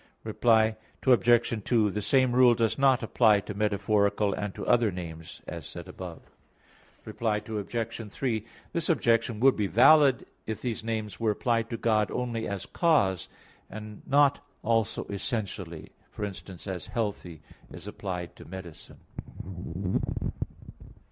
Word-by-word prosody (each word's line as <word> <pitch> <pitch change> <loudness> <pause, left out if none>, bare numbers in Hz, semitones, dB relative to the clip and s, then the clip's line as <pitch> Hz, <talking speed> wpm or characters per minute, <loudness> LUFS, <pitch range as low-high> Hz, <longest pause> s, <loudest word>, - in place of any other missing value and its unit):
Reply 110 -2 +3 0.3
Obj. 120 -3 +4
2: 110 -3 +2
The 105 - -3
same 130 +4 +3
rule 125 -1 +6
does 115 +3 0
not 135 -3 +4
apply 110 -2 +4
to 105 - -6
metaphorical 100 0 +1
and 100 0 -4
to - - -5
other 115 -2 +4
names, 80 -3 -8
as - - -7
said - - -8
above. - - -8 0.8
Reply 110 -2 -1
Obj. 110 0 -4
3: 115 -4 -1 0.3
This 170 -1 0
objection 115 -7 +2
would 135 0 +6
be 105 -2 0
valid 135 +4 +6 0.2
if 110 -1 -3
these 120 -3 -3
names 110 -2 -3
were 115 -1 +1
applied 115 +2 0
to 115 - -3
God 110 -2 +2
only 120 -2 -2
as 100 -2 -4
cause, 100 - +2 0.4
and 105 -1 -9
not 140 0 +4 0.2
also 115 -1 +1
essentially, 95 -5 -4 0.2
for 105 - -4
instance 95 -2 -8
as 95 -3 -5
"healthy" 100 -8 -4 0.3
is - - -9
applied 90 -2 -5
to - - -12
medicine. 90 -3 -10
110 Hz, 135 wpm, -28 LUFS, 100-120 Hz, 0.8 s, rule